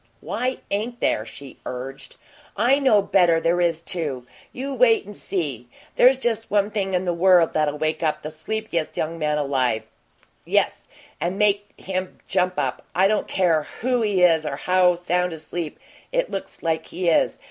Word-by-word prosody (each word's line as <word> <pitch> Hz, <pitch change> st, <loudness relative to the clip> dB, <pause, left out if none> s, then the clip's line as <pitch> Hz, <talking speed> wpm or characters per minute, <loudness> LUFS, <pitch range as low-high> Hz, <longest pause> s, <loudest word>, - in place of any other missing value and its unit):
"WHY 255 Hz, +1 st, -2 dB
ain't 225 Hz, +4 st, -2 dB
there?" 110 Hz, -, 0 dB
she 135 Hz, +4 st, -11 dB
urged. 130 Hz, +2 st, -7 dB, 0.4 s
"I 250 Hz, +7 st, +4 dB
know 220 Hz, -8 st, +4 dB
better 175 Hz, -4 st, +4 dB
there 170 Hz, +2 st, +1 dB
is, 165 Hz, -1 st, 0 dB
too! 145 Hz, -10 st, -4 dB, 0.3 s
You 275 Hz, +2 st, -5 dB
wait 235 Hz, -4 st, +4 dB
and 205 Hz, +1 st, -9 dB
see. 145 Hz, -, -3 dB, 0.3 s
There's 255 Hz, +2 st, +6 dB
just 225 Hz, -3 st, -2 dB
one 205 Hz, 0 st, +2 dB
thing 195 Hz, -3 st, -1 dB
in 180 Hz, +1 st, 0 dB
the 175 Hz, -, +1 dB
world 175 Hz, -1 st, +4 dB
that'll 150 Hz, -1 st, +1 dB
wake 155 Hz, +1 st, -1 dB, 0.2 s
the 155 Hz, -, -5 dB
sleepiest 170 Hz, 0 st, -3 dB
young 165 Hz, +1 st, -2 dB
man 150 Hz, -1 st, 0 dB
alive 130 Hz, -6 st, 0 dB
up -, -, -31 dB, 0.6 s
yes, -, -, 0 dB, 0.3 s
and 180 Hz, +3 st, -2 dB
make 205 Hz, 0 st, +1 dB
him 185 Hz, 0 st, -4 dB
JUMP 180 Hz, 0 st, +1 dB
up -, -, -1 dB, 0.2 s
and 185 Hz, -, +3 dB
I -, -, +7 dB
don't 210 Hz, +1 st, 0 dB
care 165 Hz, -5 st, +1 dB
who 250 Hz, 0 st, +1 dB
he 200 Hz, -4 st, +2 dB
is 165 Hz, -3 st, +5 dB
or 140 Hz, -, -3 dB
how 180 Hz, +3 st, +3 dB
sound 180 Hz, 0 st, -1 dB
asleep 160 Hz, 0 st, -6 dB, 0.3 s
it -, -, 0 dB
looks -, -, -6 dB
like 160 Hz, -1 st, -1 dB
he 180 Hz, 0 st, -3 dB
is. 160 Hz, -, +2 dB
180 Hz, 180 wpm, -23 LUFS, 155-205 Hz, 0.6 s, I